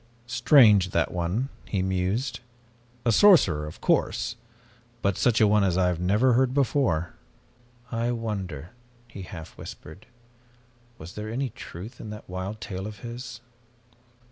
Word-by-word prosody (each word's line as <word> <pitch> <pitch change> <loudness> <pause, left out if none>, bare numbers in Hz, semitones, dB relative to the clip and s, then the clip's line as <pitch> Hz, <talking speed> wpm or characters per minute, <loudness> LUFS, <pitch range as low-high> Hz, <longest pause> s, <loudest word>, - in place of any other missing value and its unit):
"Strange, 115 - +5
that - - 0
one," 90 +10 -1 0.2
he 95 -3 -1
mused. 95 +8 -1 0.7
"A 115 - +4
sorcerer, 100 - +5
of 75 - -11
course, - - +1 0.7
but 100 -1 +2
such 120 +3 +2
a 110 - +6
one 105 0 +4
as 90 -2 +1
I 90 -1 +3
had 90 -1 -2
never 105 +8 +3
heard 130 +1 +2
before. 120 - +1 0.8
I 115 0 0
wonder," 100 - -4 0.4
he 105 -4 -9
half 85 -3 -9
whispered, 80 +7 -10 0.9
"was 85 +4 -10
there 105 0 -6
any 130 +2 -2
truth 105 +9 -10
in 110 - -8
that 105 0 -9
wild 95 +4 -5
tale 95 -2 -5
of 105 -2 -10
his? 120 -1 -8
105 Hz, 140 wpm, -26 LUFS, 90-120 Hz, 0.9 s, a